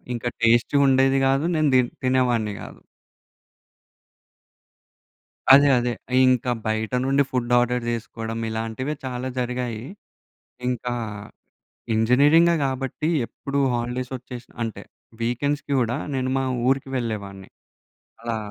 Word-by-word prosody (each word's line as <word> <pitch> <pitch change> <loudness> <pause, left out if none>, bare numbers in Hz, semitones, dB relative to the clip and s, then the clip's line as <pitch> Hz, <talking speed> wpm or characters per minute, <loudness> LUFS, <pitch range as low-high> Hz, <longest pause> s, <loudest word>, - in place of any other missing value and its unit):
ఇంకా 120 +1 -3
టెస్ట్‌గా 120 +5 +4
ఉండేది 135 0 +4
గాదు. 135 +4 +2
నేను 155 -2 +2
తి 125 - +7 0.2
తినేవాడిని 125 -5 +1
గాదు. - - -10 2.7
అదే 140 +1 +8
అదే! 120 0 -1 0.3
ఇంకా 125 -1 +2 0.2
బయట 110 +2 -1
నుండి 135 +1 +3
ఫుడ్ 125 -2 -2
ఆర్డర్ 120 0 +1
జేసుకోవడం 115 -1 -4
ఇలాంటివె 115 +6 -3
చాలా 130 0 -4
జరిగాయి. 125 -2 -3 0.9
ఇంకా 125 0 -2 1.0
ఇంజినీరింగే 145 +10 +4
గాబట్టి 135 +3 -2 0.2
ఎప్పుడు 140 0 -4
హాలిడేస్ 120 +2 -3
వచ్చేసి, 125 -1 -10 0.2
అంటే 115 -3 -5 0.4
వీకెండ్స్‌కి 140 +5 -1
గూడా 120 +1 0 0.2
నేను 130 0 -1
మా 135 - 0 0.2
ఊరికి 135 0 0
వెళ్ళేవాడిన్ని. 100 -5 -5 0.7
అలా 115 -1 -3
125 Hz, 105 wpm, -23 LUFS, 115-135 Hz, 2.7 s, అదే